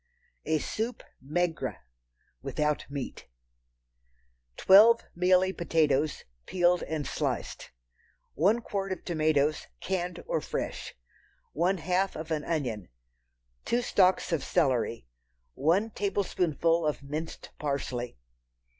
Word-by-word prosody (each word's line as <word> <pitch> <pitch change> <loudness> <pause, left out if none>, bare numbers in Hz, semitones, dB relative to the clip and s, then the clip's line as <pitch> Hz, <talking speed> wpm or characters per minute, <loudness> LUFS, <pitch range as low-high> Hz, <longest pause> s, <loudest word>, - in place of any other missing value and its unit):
A 160 - +2
Soup 225 +10 -3 0.2
Maigre 165 +4 -1 0.7
(without 150 -1 -1
Meat). 140 -2 -6 1.3
Twelve 220 +5 +7
mealy 185 +1 +3
potatoes, 155 -4 +1 0.2
peeled 180 -1 +3
and 155 -2 -3
sliced. - - -3 0.6
One 205 +9 +3
quart 195 -3 -3
of 185 - -5
tomatoes—canned 160 +3 -1
or - - -1
fresh. - - -4 0.6
One 180 +5 +1
half 180 +3 0
of 160 +1 -6
an 155 -2 0
onion. 125 - -2 0.7
Two 245 +1 0
stalks 190 -6 +3
of 160 -5 0
celery. 130 - +1 0.5
One 180 +10 +1
tablespoonful 175 -5 0
of 150 -2 -1
minced 155 +4 -6
parsley. 130 - -3
165 Hz, 100 wpm, -29 LUFS, 150-185 Hz, 1.3 s, Twelve